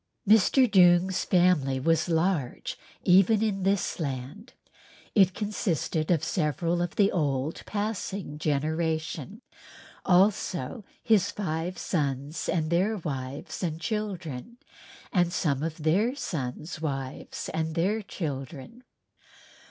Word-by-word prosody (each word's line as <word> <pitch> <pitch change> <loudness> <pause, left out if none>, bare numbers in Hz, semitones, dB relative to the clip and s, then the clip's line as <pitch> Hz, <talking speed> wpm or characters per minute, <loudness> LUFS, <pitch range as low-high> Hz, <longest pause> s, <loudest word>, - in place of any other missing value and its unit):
Mr. 220 +5 +5
Doong's 180 -2 +4
family 175 -8 +3
was 165 +4 +1
large 165 -5 0 0.3
even 195 +4 +5
for 205 -3 0
this 195 -1 0
land, 140 - -5 0.6
it 190 -3 +4
consisted 175 -7 -1
of 165 -4 +2
several 170 +1 0
of 175 -1 -3
the 200 -1 +4
old 145 -2 -1
passing 205 -6 -3
generation, 155 0 -2 0.6
also 185 - +2 0.2
his 210 -5 +3
five 175 -2 -3
sons 145 -1 -2
and 160 -3 0
their 195 +6 +2
wives 140 -5 -5
and 165 -3 -2
children 185 - -4 0.6
and 175 -2 +3
some 145 -6 0
of 160 0 -3
their 205 - +2
sons' 155 - -4
wives 135 -4 -4
and 160 0 -2
their 195 +6 +1
children. 155 - -6
170 Hz, 110 wpm, -27 LUFS, 150-195 Hz, 0.6 s, Mr